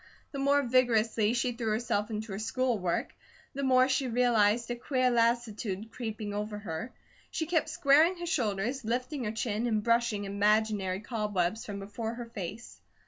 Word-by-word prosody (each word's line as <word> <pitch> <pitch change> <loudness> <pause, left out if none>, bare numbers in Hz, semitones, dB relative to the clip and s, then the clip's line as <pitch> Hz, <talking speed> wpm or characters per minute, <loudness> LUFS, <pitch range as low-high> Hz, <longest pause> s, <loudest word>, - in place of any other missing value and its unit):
The 275 - -5
more 280 +1 +3
vigorously 235 -3 +2
she 245 +1 +1
threw 235 -1 -4
herself 215 -1 0
into 215 -1 -4
her 195 - -4
school 245 +1 0
work, 180 -2 -1 0.4
the 280 - -4
more 255 -1 +4
she 265 0 +1
realized 235 -1 +2
a - - -1
queer 255 +1 +1
lassitude, 225 -3 0
creeping 220 -3 -5
over 210 +1 -3
her. 205 +3 -5 0.4
She 320 - -2
kept 325 0 +1
squaring 310 +6 +4
her 345 - -5
shoulders, 245 - -1
lifting 250 +4 -2
her 210 - -1
chin, 225 +1 -1
and 215 -2 0
brushing 230 -3 +1
imaginary 200 -1 +1
cobwebs 210 -3 -1
from 205 -1 -5
before 215 +3 -5
her 240 0 -6
face. 220 0 -8
230 Hz, 165 wpm, -30 LUFS, 210-250 Hz, 0.4 s, more